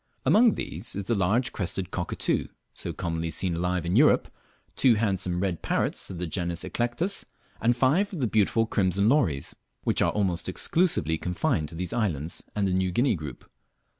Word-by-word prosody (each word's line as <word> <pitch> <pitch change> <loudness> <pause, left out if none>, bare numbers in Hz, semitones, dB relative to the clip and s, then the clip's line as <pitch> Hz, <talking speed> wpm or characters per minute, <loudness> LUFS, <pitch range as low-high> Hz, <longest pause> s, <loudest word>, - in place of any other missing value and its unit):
Among 225 0 +5
these 90 +9 -4
is 100 -1 -3
the 120 - +1
large 105 +5 +1
red - - -26
crested 95 -1 -3
cockatoo, 90 -1 -1 0.3
so - - -3
commonly 85 -2 -3
seen 90 +3 0
alive 90 0 -1
in 85 +3 0
Europe, 145 +6 +4 0.4
two 125 -4 +4
handsome 95 -5 0
red 95 -4 -1
parrots - - -1
of 95 - -6
the 90 - -3
genus 85 0 -2
Eclectus, 120 +12 -2 0.4
and 120 +1 +2
five 150 +11 +2
of 180 - -5
the 130 - +1
beautiful 110 0 +2
crimson 100 -2 +1
lories, 95 - +1 0.3
which - - +1
are - - +3
almost 95 -4 -1
exclusively 90 - +1
confined 90 - -1
to 85 - -9
these 90 +1 -4
islands 85 - -1
and 100 -2 +1
the 95 - 0
New 95 0 +1
Guinea 125 +9 +2
group. 75 -7 -7
95 Hz, 180 wpm, -27 LUFS, 85-120 Hz, 0.4 s, Among